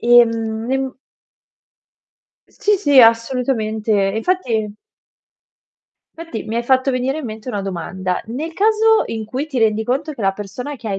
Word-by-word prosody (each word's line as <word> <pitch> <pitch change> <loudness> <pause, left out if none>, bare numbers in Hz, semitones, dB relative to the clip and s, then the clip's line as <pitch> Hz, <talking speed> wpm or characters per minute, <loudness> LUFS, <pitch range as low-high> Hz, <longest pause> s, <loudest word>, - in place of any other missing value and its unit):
Ehm, 230 -1 +3
n 265 0 -1 1.6
Sì, 420 -1 +1
sì, 285 -8 +5
assolutamente, 225 -3 +2
e - - -4
infatti 225 - -1 1.4
fatti 330 -8 -7
mi 225 +2 -4
hai 235 - 0
fatto 260 +2 +2
venire 260 +4 -1
in 300 - -6
mente 220 +2 -7
una 205 -4 -3
domanda. 185 0 -3
Nel 290 +9 -5
caso 440 +3 +3
in 220 -1 -4
cui 260 +7 -4
ti 270 -5 -3
rendi 220 -1 +2
conto 290 +6 -1
che 245 - -11
la 195 -1 +2
persona 250 +8 -7
che 230 -3 -7
hai 195 -1 -2
235 Hz, 155 wpm, -19 LUFS, 220-275 Hz, 1.6 s, sì